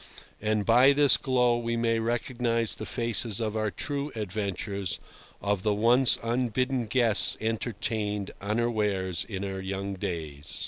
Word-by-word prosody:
And 105 -1 0
by 125 +4 +6
this 145 -1 +6
glow 125 -3 +2
we 115 0 -2
may 115 -1 +1
recognise 115 0 0
the - - -6
faces 115 -3 -1
of 110 -2 -2
our 110 -1 0
true 140 - -3
adventures, 100 -2 -3 0.4
of 100 -2 0
the 105 0 +1
once 120 +4 +4
unbidden 125 +1 0
guests 115 -2 +3
entertained 105 -2 -2
unawares 105 -4 0
in 100 -2 -4
our 95 -1 -4
young 100 +1 -4
days. 80 -7 -4
110 Hz, 135 wpm, -28 LUFS, 100-120 Hz, 0.4 s, by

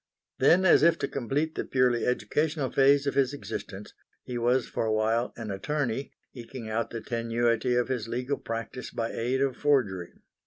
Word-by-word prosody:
Then, 170 +8 +5
as 185 - +6
if 170 +2 +5
to - - -2
complete 140 +5 -2
the - - -3
purely 125 -2 +1
educational 145 +3 0
phase 140 +1 +4
of 140 - 0
his 140 0 +1
existence, 105 -7 -7 0.3
he 125 - -6
was 120 +1 +2
for - - -2
a - - +1
while 110 +2 +1
an 115 -3 -5
attorney, 135 +4 -2 0.2
eking 120 -1 -8
out 110 +2 -1
the 115 - -6
tenuity 115 +1 0
of 120 0 +1
his 125 -4 -2
legal 125 +4 -2
practice 115 +2 -5
by 115 -1 -3
aid 125 +3 -1
of 135 -2 +1
forgery. 105 -12 +1
125 Hz, 180 wpm, -28 LUFS, 115-140 Hz, 0.3 s, as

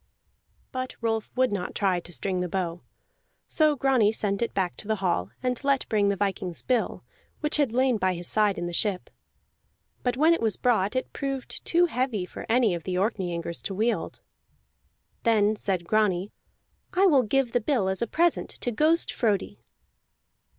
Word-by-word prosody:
But 255 0 -4
Rolf 225 -2 -1
would 255 -2 +3
not 190 -3 -3
try 190 -3 +1
to 175 - -12
string 185 +2 -2
the 180 0 -2
bow. 175 -2 -2 0.7
So 310 -2 +3
Grani 255 -6 +3
sent 205 -2 -2
it 235 - 0
back 185 -3 0
to 205 - -7
the 220 - +1
hall, 175 - -1
and 250 +1 -1
let 275 -1 +1
bring 205 -2 +2
the 200 - +1
viking's 190 -3 -2
bill, 250 -3 0 0.4
which 300 -1 0
had 285 -6 +2
lain 255 0 +2
by 185 -1 +1
his 175 +1 -3
side 210 +1 +2
in 175 - -3
the 175 - -4
ship. 190 0 -1 0.9
But 245 -1 -1
when 315 +4 +5
it 335 - -1
was 220 -2 +1
brought, 220 -3 +1
it 255 - -2
proved 275 -2 -4
too 350 +1 +4
heavy 250 - -1
for - - -9
any 230 -4 +3
of 170 - -3
the 180 +2 -3
Orkneyingers 180 -5 -2
to 195 - -3
wield. 225 +4 -1 1.0
Then 215 -2 +3
said 190 -4 -2
Grani: 200 -1 +1 0.6
"I 375 +2 +4
will 290 -8 +6
give 250 +2 +1
the 245 - +1
bill 220 -5 +1
as 190 +2 -1
a 235 - 0
present 340 +7 +1
to 245 - -1
Ghost 310 +8 +2
Frodi." 210 -6 -1
215 Hz, 180 wpm, -26 LUFS, 190-255 Hz, 1.0 s, will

